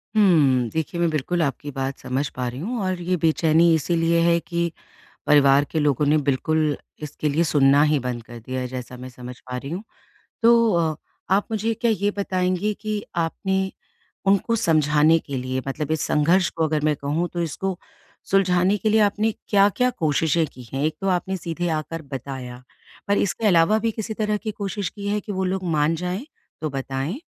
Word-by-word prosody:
हुँ। 145 - +4
देखिए, 160 +2 -2
मैं 170 - +3
बिल्कुल 160 +3 -1
आपकी 145 -1 -2
बात 135 0 -3
समझ 130 +3 -2
पा 125 -1 -2
रही 125 +2 -5
हूँ 230 - -3
और 185 -1 -1
ये 180 +1 0
बेचैनी 165 +1 +3
इसीलिए 165 +1 +1
है 170 0 +3
कि 170 -1 -2 0.6
परिवार 140 -1 +5
के 160 - 0
लोगों 145 -1 +2
ने 150 +2 +4
बिल्कुल 150 +2 0 0.3
इसके 150 0 -3
लिए 155 +4 +2
सुनना 140 -3 +4
ही 150 -1 +2
बंद 125 -2 -4
कर 120 +1 -11
दिया 130 +3 -5
है, 125 - -3
जैसा 125 0 -7
मैं 130 +1 -8
समझ 125 0 -9
पा 125 0 -6
रही 140 +3 -7
हूँ। 185 +5 -4 0.6
तो 230 -1 +5
अ, 165 -2 +1 0.4
आप 200 +1 +2
मुझे 220 +1 0
क्या 230 +1 0
ये 205 -1 0
बताएँगी 185 +1 0
कि 215 -1 -3
आपने 190 +3 -1 0.6
उनको 200 +4 +3
समझाने 155 -5 +3
के 140 -3 -6
लिए 130 +1 -3
मतलब 150 +2 -3
इस 160 - 0
संघर्ष 170 +5 +3
को 165 - -2
अगर 155 -1 0
मैं 155 -1 +2
कहूँ, 150 +5 -1
तो 175 - -3
इसको 175 +3 -3 0.5
सुलझाने 190 0 +3
के 215 - 0
लिए 220 +1 +4
आपने 210 +2 +2 0.2
क्या-क्या 205 +5 +3
कोशिशें 160 - +1
की 125 - -11
हैं? 135 +1 -1
एक 155 - -1
तो 195 - -1
आपने 185 +1 -1
सीधे 175 +1 -3
आकर 165 +2 -5
बताया, 130 -3 -7 0.4
पर 200 0 +2
इसके 210 +3 0
अलावा 180 +3 +4
भी 225 +1 0
किसी 220 0 -5
तरह 210 -1 -1
की 215 +1 -4
कोशिश 200 -1 -4
की 200 -1 -7
है 205 +1 0
कि 205 - -7
वो 190 -1 -2
लोग 190 +1 -2
मान 150 +2 +2
जाएँ? 180 - -4 0.4
तो 155 - -1
बताएँ। 135 - -3
165 Hz, 195 wpm, -23 LUFS, 145-195 Hz, 0.6 s, परिवार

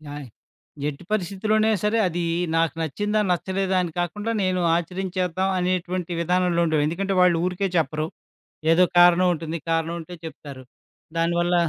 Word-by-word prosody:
ఆయ్! 145 -2 -8 0.6
ఎట్టు 145 +4 -9
పరిస్థితిలోనే 215 +2 +1
సరే, 210 +2 +2
అది 175 0 -2 0.3
నాకు 165 -3 +2
నచ్చిందా 205 +7 -1
నచ్చలేదా? 190 +2 -1
అని 170 - -4
కాకుండా 205 +6 -2
నేను 185 -1 +1
ఆచరించేద్దాం 185 +1 -2
అనేటువంటి 180 -1 -1
విధానంలో 180 0 +1
ఉండేవు. 155 -2 +2
ఎందుకంటే 195 +5 -2
వాళ్ళు 180 -2 +5
ఊరికే 185 +2 -1
చెప్పరు, 155 0 0 0.7
ఏదో 180 +2 +5
కారణం 175 +1 +6
ఉంటుంది, 165 0 -4
కారణం 165 0 0
ఉంటే 175 +2 -9
చెప్తారు. 140 -4 -10 0.5
దానివల్ల 175 +1 +1
175 Hz, 135 wpm, -24 LUFS, 165-185 Hz, 0.7 s, కారణం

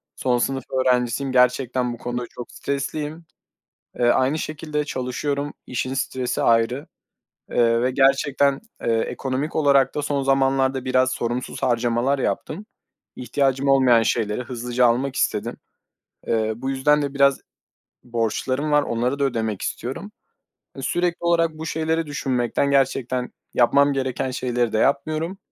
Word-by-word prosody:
Son 125 -1 +1
sınıf 135 +1 -1
öğrencisiyim. 130 0 +1
Gerçekten 125 -1 +2
bu - - -8
konuda 120 +1 -4
çok 120 - -9
stresliyim. 150 +3 -4 0.7
Eee, 120 - +3
aynı 130 +5 +3
şekilde, 150 -1 -3
çalışıyorum, 140 +2 -3
işin 130 +1 -2
stresi 130 -2 -2
ayrı, 115 +4 +2 0.6
eee, 115 -1 +3
ve 125 +1 +1
gerçekten, 135 +1 +3 0.2
eee, 115 - +1
ekonomik 135 +6 -3
olarak 140 -3 +3
da 150 - -1
son 145 -1 -1
zamanlarda 135 -1 +2
biraz 130 0 +2
sorumsuz 120 +2 -3
harcamalar 120 +2 +1
yaptım. 150 - -3 0.5
İhtiyacım 135 +1 0
olmayan 130 -4 +5
şeyleri 110 0 0
hızlıca 125 0 0
almak 130 +3 0
istedim. - - -1 0.7
Eee, 110 -1 +1
bu 130 +3 -3
yüzden 150 +3 +2
de 140 -1 -3
biraz 140 -1 +3 0.6
borçlarım 125 +5 -1
var. 150 0 +4
Onları 125 +4 -1
da - - +1
ödemek 110 -6 -1
istiyorum. - - -5 0.7
Eee, - - -6
sürekli 175 +5 0
olarak 165 -2 +1
bu 160 - -6
şeyleri 160 +1 -1
düşünmekten, 135 -1 0
gerçekten 130 -2 0 0.2
yapmam 140 +4 +4
gereken 130 -1 -2
şeyleri 125 -2 -1
de - - +2
yapmıyorum 155 +7 0
130 Hz, 135 wpm, -23 LUFS, 125-140 Hz, 0.7 s, olmayan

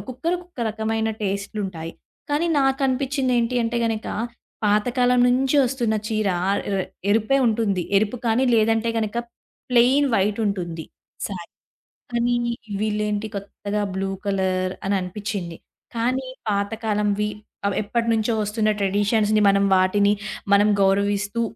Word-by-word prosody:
ఒక్కొక్కరికి 330 +8 -2
ఒక్కొక్క 355 -7 -12
రకమైన 220 +1 -1
టేస్ట్‌లుంటాయి. 195 -4 -3 0.4
కానీ 295 +4 +1
నాకు 270 0 +2
అనిపించింది 265 0 0
ఏంటి 235 +1 0
అంటే 235 +1 -1
గనక 225 -1 -2 0.6
పాతకాలం 245 +4 +3
నుంచి 265 +3 +2
వస్తున్న 240 -3 0
చీర 215 -2 0 0.2
ఆహ్, 200 - +1 0.5
ఎరుపే 225 +6 +3
ఉంటుంది. 215 -5 +1 0.2
ఎరుపు 215 +4 -1
కానీ 230 +3 +3
లేదంటే 225 +1 +2
గనక 220 0 -2 0.5
ప్లెయిన్ 255 +4 +5
వైట్ 200 +1 +1
ఉంటుంది 170 -5 -3 0.4
సారీ. 180 -4 -7 0.6
కానీ 240 0 +1 0.5
వీళ్ళు 210 -1 0
ఏంటి 210 +1 -2
కొత్తగా 200 +1 -4
బ్లూ 195 0 -1 0.2
కలర్ 185 -2 0
అని 200 - +2
అనిపిచింది. 180 -2 -5 0.4
కానీ 255 +3 0 0.2
పాత 200 0 0
కాలంవి 210 -1 +1 0.4
అవేప్పటినుంచో 225 +2 0
వస్తున్న 215 +1 0
ట్రెడిషన్స్‌ని 205 +2 +2
మనం 200 0 +3
వాటిని 200 +2 +3 0.4
మనం 205 +1 +5 0.2
గౌరవిస్తూ 200 +3 +1
215 Hz, 120 wpm, -23 LUFS, 200-235 Hz, 0.6 s, ప్లెయిన్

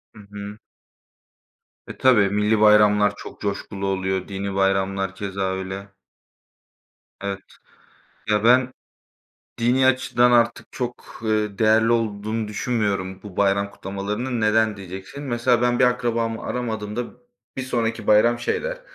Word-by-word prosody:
Hı - - -13
hı. 105 +1 -7 1.3
E, - - -8
tabii 110 -7 +4
millî 105 +1 +1
bayramlar 105 -1 +5
çok - - -11
coşkulu 100 -1 -3
oluyor, 95 -1 -1
dini 100 0 -4
bayramlar 95 0 0
keza 100 -1 -5
öyle. 95 +1 -6 1.3
Evet, 100 -1 -3 0.9
ya, 105 0 +2
ben 125 +2 +4 0.9
dini 125 +3 +3
açıdan 125 -1 +3
artık 120 0 +2
çok, 125 -2 -6
ııı, 105 -2 -1
değerli 110 +1 +4
olduğunu 110 -1 -1
düşünmüyorum 100 -4 -2
bu 100 -3 -11
bayram 100 0 +1
kutlamalarının. 105 +6 -4
Neden, 110 0 +2
diyeceksin. 95 +8 -9
Mesela 120 -2 +1
ben 120 0 +2
bir 125 - +5
akrabamı 115 -2 0
aramadığımda 110 -1 -3 0.5
bir 130 - -2
sonraki 115 -3 -2
bayram 120 +3 +4
şey 120 - -1
der: - - -4
105 Hz, 125 wpm, -23 LUFS, 100-120 Hz, 1.3 s, bayramlar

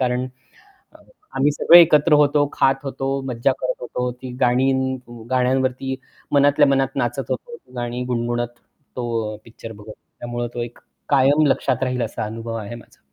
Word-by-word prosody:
कारण 125 0 0 0.7
अ, - - -16 0.4
आम्ही 140 +2 +3
सगळे 170 +4 +8
एकत्र 150 -1 +4
होतो, 145 0 +4
खात 135 0 +3
होतो, 135 0 -2
मज्जा 125 +1 +1
करत 130 0 -2
होतो. 125 0 -3
ती 125 +1 -9
गाणी 125 +2 +3 0.6
गाण्यांवरती 130 +1 0 0.4
मनातल्या 145 +1 +5
मनात 135 0 +1
नाचत 130 +1 -2
होतो 235 - -4 0.2
गाणी 120 0 -3
गुणगुणत 120 -1 -1 0.5
तो 125 - -3 0.3
अ, - - -8
पिक्चर 115 0 -10
बघत 105 0 -11
त्यामुळे 120 0 -6
तो 120 - -2
एक 120 0 -8 0.3
कायम 140 +2 +4
लक्षात 130 -2 +1
राहील 125 -1 0
असा 115 - -3
अनुभव 115 +1 -6
आहे 110 +1 -6
माझा. 115 - -16
130 Hz, 155 wpm, -21 LUFS, 120-135 Hz, 0.7 s, सगळे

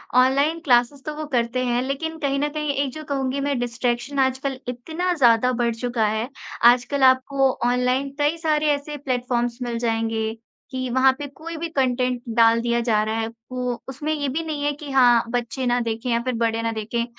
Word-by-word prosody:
Online 280 +6 +3
classes 245 +2 +3
तो 305 0 -4
वो 310 - -5
करते 240 +1 +1
हैं, 245 0 +1
लेकिन 320 +4 -3
कहीं 275 -2 0
न 295 +1 0
कहीं 300 -1 -2
एक 270 - -3
जो 310 - -7
कहूँगी 275 -2 -2
मैं 280 - 0
डिस्ट्रैक्शन 245 +3 -2
आजकल 265 0 0
इतना 320 +9 -2
ज़्यादा 250 -5 +4
बढ़ 235 -1 +1
चुका 235 -1 -1
है, 220 +3 -2 0.4
आजकल 265 +3 -1
आपको 260 +1 +4 0.2
ऑनलाइन 250 +2 +1
कई 295 +3 +2
सारे 305 -2 +1
ऐसे 290 +1 -5
प्लेटफॉर्म्स 245 -3 -1
मिल 235 -1 -3
जाएँगे, 225 -1 -1 0.4
कि 255 -1 -3
वहाँ 260 +2 +4
पे 290 - -4
कोई 320 +4 -8
भी 335 +1 -4
कंटेंट 255 -3 0 0.2
डाल 230 0 +5
दिया 235 0 +1
जा 220 -3 +2
रहा 220 +1 -2
है, 225 - -1 0.2
वो 250 -1 -3
उसमें 295 +4 -3
ये 290 -2 -2
भी 315 +5 -2
नहीं 305 -2 -4
है 290 - +2
कि 290 -1 -9
हाँ, 245 -3 +5
बच्चे 245 +2 -2
ना 245 0 +2
देखें 230 +1 -3
या 235 - +2
फिर 255 -1 -1
बड़े 230 0 0
ना 230 0 -1
देखें। 225 +2 -2
255 Hz, 200 wpm, -23 LUFS, 235-285 Hz, 0.4 s, डाल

